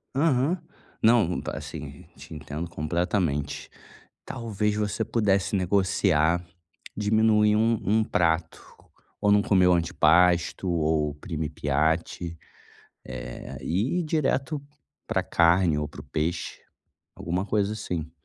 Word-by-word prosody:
Aham, 145 +3 +2 0.5
não, 110 -7 +4
tá - - -5
assim, 70 -1 -8
te 75 +4 -12
entendo 75 +2 -6
completamente. 85 -2 -2 0.6
Talvez 105 -2 -2
você 105 +1 -1
pudesse 105 -3 +1
negociar, 90 -3 +2 0.5
diminuir 105 0 +3
um 115 0 +2
um 110 +3 +2
prato, 80 -3 0 0.6
ou 105 - +2
não 105 0 +5
comer 95 -3 +3
o 90 - +5
antipasto 85 +2 +3
ou 80 -2 +1
o - - -11
primi 80 +1 -4
piatti, 80 +3 -1 0.7
eh, - - -7
e 110 - 0
ir - - -1
direto 145 -2 -1 0.5
pra 95 - 0
carne 85 -2 +3
ou 75 0 -2
para 75 - -10
o - - -15
peixe, 80 +4 -3 0.6
alguma 90 +3 -2
coisa 105 0 0
assim, 90 -7 -4
90 Hz, 120 wpm, -26 LUFS, 80-105 Hz, 0.7 s, não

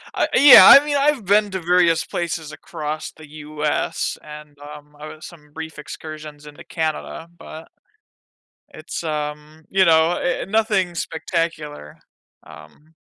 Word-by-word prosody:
I - - +1
uh, - - -5
yeah, 285 0 +9
I 290 - -8
mean, 295 -1 -2
I've 280 -5 0
been 205 +2 +2
to 190 - -4
various 175 -1 +2
places 165 -3 -5
across 155 -1 -7
the 155 -1 -16
US 150 0 -4
and, 150 -1 -12
um, 150 0 -13
I 150 - -9
had 155 0 -12
some 150 -5 -14
brief 160 0 -9
excursions 150 -1 -10
into 150 -1 -13
Canada, 160 +1 -5
but 160 -1 -12 1.0
it's, - - -8
um, 150 0 -6
you 190 0 +2
know, 160 0 +4
uh 175 0 -2
uh, - - -8
nothing 200 -4 0
spectacular, 160 - -5 0.5
um 150 - -17
160 Hz, 145 wpm, -20 LUFS, 150-175 Hz, 1.0 s, yeah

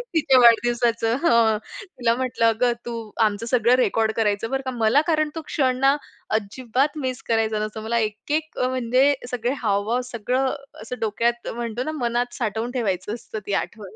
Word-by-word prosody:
तिच्या 270 -5 +5
वाढदिवसाचं" 235 -1 +4
हं. 230 -7 +4 0.4
तिला 235 -1 +2
म्हटलं 250 -2 0
"अगं, 235 +2 +3
तू 235 -1 -4 0.3
आमचं 210 +2 -1
सगळं 240 0 +3
रेकॉर्ड 225 -3 +2
करायचं 210 0 0
बरं 270 - 0
का?" 260 - -2
मला 230 +6 +4
कारण 310 -2 +2
तो 325 - -4
क्षण 260 -5 +1
ना 275 +1 +4 0.4
अजिबात 255 +7 -2
मिस 255 -1 -3
करायचा 220 -1 +1
नसतो. 215 0 -7
मला 230 +2 -1
एक-एक 300 +9 -4
म्हणजे 255 +2 +2 0.2
सगळे 245 +1 -1
हावभाव, 215 +3 0
सगळं 250 +4 0 0.3
असं 250 +3 -7
डोक्यात, 235 +2 0
म्हणतो 235 0 -3
ना 310 - -3
मनात 240 +1 0
साठवून 225 +2 -2
ठेवायचं 200 -3 -1
असतं 225 -1 -7
ती 200 - -2
आठवण. 210 -3 -11
235 Hz, 165 wpm, -23 LUFS, 220-255 Hz, 0.4 s, तिच्या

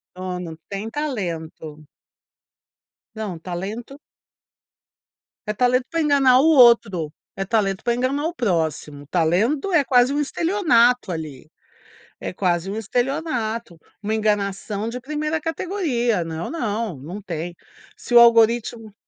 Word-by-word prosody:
Não, 185 -1 -5
não 165 -3 -7
tem 205 +3 -4
talento. 165 - -5 1.3
Não, 210 -6 -5
talento 205 - -6 1.5
É 210 - -1
talento 250 +2 +2
pra 330 -1 -1
enganar 275 -4 +5
o 280 - +3
outro, 235 - +5 0.2
é 195 - -2
talento 195 -2 0
pra 235 0 +1
enganar 270 +4 -1
o 345 - -4
próximo. 160 - -2
Talento 195 - +1
é 305 - +5
quase 255 0 +3
um 290 - 0
estelionato 275 - +2
ali. 155 -4 -7 0.7
É - - -4
quase 180 0 -1
um 210 - -4
estelionato, 235 - -2 0.3
uma 215 +1 -1
enganação 205 0 -1
de 250 +2 -5
1ª 305 +4 -2
categoria. 300 - -1
Não, 165 +1 -5
não, 225 - -3
não 175 +10 -8
tem. 170 -2 -5 0.4
Se 245 - -5
o 240 - +10
algoritmo 230 -1 +3
225 Hz, 125 wpm, -22 LUFS, 180-255 Hz, 1.5 s, o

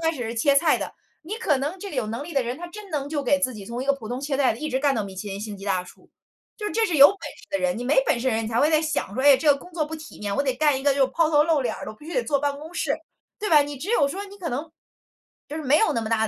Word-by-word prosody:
开 325 - -7
始 250 - -4
是 225 +1 -4
切 275 +5 +3
菜 310 +3 +4
的， - - -5 0.3
你 345 +7 -5
可 310 - +1
能 295 +8 -3
这 400 - -6
个 295 - -7
有 245 -4 0
能 230 +5 -4
力 335 +3 -8
的 275 -3 +2
人 240 +2 -4
他 350 - -7
真 420 +3 -10
能 285 -3 -2
就 290 -1 -2
给 280 +2 +2
自 260 -2 +1
己 205 -2 -8
从 235 +3 -4
一 - - -7
个 280 - +4
普 250 -6 -7
通 245 +2 -3
切 280 -1 -2
菜 270 -2 +3
的 225 - -9
一 310 - -3
直 260 - 0
干 280 -1 +2
到 220 - 0
米 195 -1 -8
其 205 +2 -5
林 195 - -5
星 210 -1 -6
级 195 - -9
大 190 -2 0
厨。 180 - -17 0.5
就 430 - -7
是 - - -3
这 455 0 +2
是 345 - -1
有 280 0 +10
本 400 - -3
事 - - -9
的 290 - 0
人， 270 -1 0
你 245 - -4
没 265 +2 +4
本 - - +2
事 260 - +1
的 230 - +1
人 225 0 -1
你 - - -3
才 230 0 0
会 300 - +4
在 310 - +4
想 310 -10 -2
说， 260 - -1
哎， 280 -1 +8
这 295 +3 +3
个 280 - -2
工 360 - -13
作 325 -2 0
不 315 - -6
体 310 -7 -12
面， 205 -1 -2
我 280 - +2
得 265 -2 0
干 290 0 +2
一 - - -8
个 285 -1 +4
就 280 - -1
是 - - +1
抛 330 0 +3
头 295 -1 +5
露 315 -2 +2
脸 240 -4 -1
儿 - - -7
的， - - -6
我 - - -18
必 300 - -14
须 345 - -6
得 - - +2
坐 290 -8 +1
办 285 0 -1
公 315 +3 -10
室， 285 -5 0 0.4
对 420 - -3
吧？ 305 -2 +7
你 290 0 -6
只 330 +10 -5
有 305 -12 +4
说 390 +8 -5
你 400 0 -12
可 350 -4 -4
能， 295 +4 -4 0.8
就 300 - -5
是 315 - -4
没 290 +2 +4
有 445 - +3
那 230 - 0
么 220 - -4
大 220 -1 +2
280 Hz, 400 characters per minute, -24 LUFS, 245-315 Hz, 0.8 s, 有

